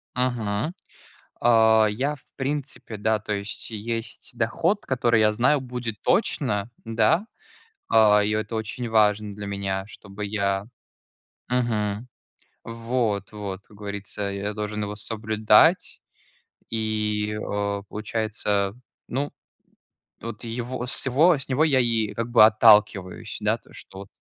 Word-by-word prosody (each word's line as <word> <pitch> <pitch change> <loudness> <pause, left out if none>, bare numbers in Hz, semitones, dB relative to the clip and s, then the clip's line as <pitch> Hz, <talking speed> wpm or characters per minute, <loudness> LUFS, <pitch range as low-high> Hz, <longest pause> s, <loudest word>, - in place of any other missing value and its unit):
Ага, 120 - -1 0.7
а, 110 -2 +5
я, 135 +8 -1
в 130 - -24
принципе, 135 -4 -4
да, 110 +1 +1
то 105 0 -5
есть 100 +3 -5
есть 115 +2 -5
доход, 165 - 0
который 120 -3 +2
я 105 0 +4
знаю, 130 +6 +3
будет 125 -4 -5
точно. 105 +2 +1
Да, 155 - +2 0.6
а, 105 -1 +5
и 105 - 0
это 110 +1 -2
очень 115 +2 -4
важно 105 -2 +2
для 105 0 -7
меня, 100 -1 -2
чтобы 100 0 -9
я 100 -1 -1 0.8
Мгм, 115 -2 -1 0.6
вот 115 -3 -2
вот, 100 -2 -5
как 105 - -18
говорится, 100 0 -5
я 100 +1 -3
должен 105 0 -3
его 105 0 -4
соблюдать. 110 - +3 0.7
И, 105 -1 -1
э, 100 -1 -2
получается, 105 -2 -1 0.3
ну, 140 +4 -2 0.9
вот 115 0 -7
его 120 +2 -4
с 125 - +2
его 150 +6 +4
с 135 - -5
него 140 +4 +2
я 140 -5 +4
и, 115 -3 +1
как 115 +1 -3
бы, 110 -3 +8
отталкиваюсь. 105 -4 +3
Да, - - +1
то, - - -25
что 95 - -10
вот 100 - -9
110 Hz, 130 wpm, -24 LUFS, 105-120 Hz, 0.9 s, бы